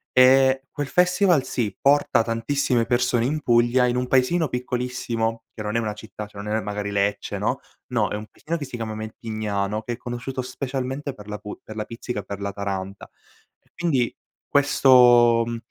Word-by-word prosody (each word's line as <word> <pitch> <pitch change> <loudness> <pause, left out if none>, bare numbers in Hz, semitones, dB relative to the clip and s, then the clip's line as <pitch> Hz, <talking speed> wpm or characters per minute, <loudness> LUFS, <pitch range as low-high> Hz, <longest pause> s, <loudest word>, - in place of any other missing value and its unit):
Ehm, 130 +1 +6
quel 145 -2 -3
festival, 180 -2 +3
sì, 110 -7 -2
porta 145 -3 +4
tantissime 115 +1 0
persone 120 -1 +1
in 150 +4 -1
Puglia 120 0 +3
in 120 - 0
un 125 0 0
paesino 135 +6 +2
piccolissimo, 125 -3 -2
che 110 - -7
non 105 +1 -3
è - - +3
una 110 -2 -2
città, 105 0 -9
cioè 100 -1 -9
non 105 +1 -2
è 110 - 0
magari 105 -1 -4
Lecce, 100 0 -1
no, - - 0 0.3
no - - 0
è - - -3
un 105 +1 -6
paesino 165 +8 -5
che 150 - -6
si 130 - -8
chiama 115 -2 -4
Mentignano, 110 -1 -3
che 120 +2 -4
è - - -7
conosciuto 125 +2 -5
specialmente 135 +2 -4
per 105 -3 -13
la 105 0 -5
pu 105 - -8
per 110 - -10
la 110 - -2
Pizzica 115 -1 -5
e - - -6
per 100 0 -6
la 100 0 -3
Taranta. 100 -1 -5 0.5
E - - -37
quindi 145 -9 0 0.3
questo 125 -4 +5
mhmm, 120 0 -3
120 Hz, 190 wpm, -23 LUFS, 110-130 Hz, 0.5 s, Ehm